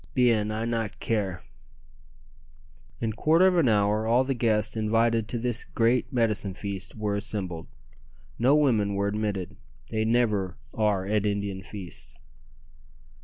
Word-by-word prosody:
"Bien, 115 -5 +3
I 110 +1 -2
not 115 -3 -2
care!" 95 -6 -2 1.6
In 115 -2 -1
quarter 160 - +4
of 185 -1 +4
an 140 -7 +4
hour 105 +1 +2
all 120 +3 +4
the 135 +1 -1
guests 110 -4 0
invited 115 +1 +1
to 120 - -3
this 120 0 -1
great 115 +2 +1
"medicine 110 -6 0
feast" 95 -2 -6
were 105 -2 -1
assembled. 95 -5 -4 0.7
No 130 +5 +5
women 110 -9 +2
were 100 0 0
admitted. 100 -3 -3 0.3
They 110 -1 0
never 110 -5 +1 0.2
are 105 -3 +1
at 105 +1 +1
Indian 100 -2 -2
feasts. 85 -8 -8
110 Hz, 135 wpm, -27 LUFS, 100-115 Hz, 1.6 s, No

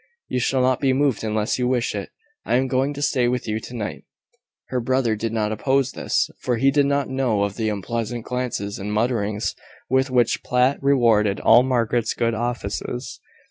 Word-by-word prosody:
"You 125 - 0
shall 130 +1 +1
not 130 0 +2
be 135 -2 +2
moved 135 -4 +1
unless 110 +2 -1
you 125 - +1
wish 125 -2 0
it. 100 -2 -5 0.3
I - - 0
am 130 +1 +2
going 130 +2 +1
to 145 - -4
stay 130 -4 +2
with 125 -1 -1
you 110 0 -1
to 120 +3 -9
night." 105 -3 -5 0.7
Her 130 - -1
brother 125 -2 +1
did 110 +1 -3
not 110 -2 -1
oppose 135 +4 +1
this, - - 0
for 120 -2 -1
he 135 +4 +3
did 140 0 +3
not 140 0 +1
know 130 -6 0
of 100 -1 -2
the 110 -2 -1
unpleasant 115 +3 -3
glances 125 -5 -3
and 100 +2 -4
mutterings, 105 -1 0 0.4
with 130 +1 +2
which 125 -2 +2
Platt 125 +2 +1
rewarded 115 -7 +3
all 120 - +6
Margaret's 120 -3 0
good 115 -1 0
offices. 120 +1 -4
120 Hz, 190 wpm, -22 LUFS, 110-130 Hz, 0.7 s, all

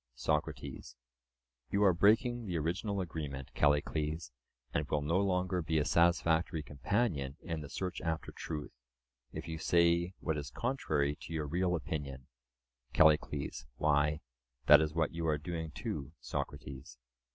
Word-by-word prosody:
SOCRATES: 65 - -2 0.7
You 100 +1 +2
are 95 -3 +6
breaking 110 +5 +3
the 90 -3 -1
original 95 +6 -1
agreement, 75 -6 -5
Callicles, 75 0 +1 0.4
and 75 - -1
will 75 -1 0
no 85 +5 +2
longer 90 -2 +1
be 80 0 0
a 75 - +2
satisfactory 85 -1 +3
companion 75 - -1
in 80 -4 -3
the 70 - -8
search 90 -1 -4
after 80 -1 -2
truth, 75 -3 -5 0.6
if - - -6
you 80 -1 -4
say 85 +2 +3
what 80 -3 -1
is 70 -2 -6
contrary 75 - 0
to 80 - -9
your 80 -2 -1
real 90 +4 +1
opinion. 70 -5 -4 0.7
CALLICLES: 75 -3 +3
Why, 75 +1 +2 0.4
that 75 +2 +9
is 80 0 -1
what 80 -2 +1
you 85 -1 -2
are 75 -1 +2
doing 80 +1 -4
too, 70 -1 -5
Socrates. 65 -2 -6
80 Hz, 140 wpm, -33 LUFS, 75-90 Hz, 0.7 s, that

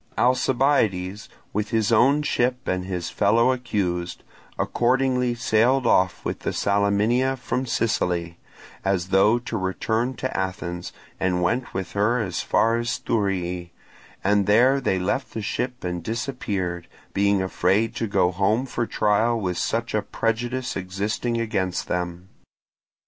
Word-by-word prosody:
Alcibiades, 120 -7 +1 0.2
with 105 +1 -1
his 110 -2 +1
own 135 +6 +4
ship 125 -3 0
and 90 0 -1
his 90 -2 -4
fellow 115 +5 +3
accused, 90 -9 -2 0.3
accordingly 125 0 +1
sailed 120 +3 +2
off 95 -5 +2
with - - -2
the - - -2
Salaminia 105 +6 +1
from 130 +1 -2
Sicily, 85 -8 -1 0.4
as 95 -2 0
though 100 +4 +4
to 120 - -5
return 110 +7 -1
to 130 - -4
Athens, 90 -2 -3 0.3
and 90 -1 +1
went 120 +9 0
with 95 0 -3
her 105 +5 +1
as 95 -6 -2
far 115 +1 +2
as 120 0 -1
Thurii, 90 -5 -1 0.5
and 100 0 +2
there 125 +6 +4
they 95 -7 +1
left 130 +9 -2
the 110 - -2
ship 125 +4 -3
and 90 -1 -3
disappeared, 100 -6 -3 0.3
being 100 0 +2
afraid 95 +4 +1
to 115 - -1
go 95 -3 +2
home 105 +7 +1
for 120 -3 -2
trial 110 +3 +2
with 90 -4 -2
such 115 0 -1
a 105 - +2
prejudice 120 +5 -2
existing 105 +5 -2
against 100 -5 -1
them. 90 0 -3
105 Hz, 140 wpm, -24 LUFS, 95-120 Hz, 0.5 s, own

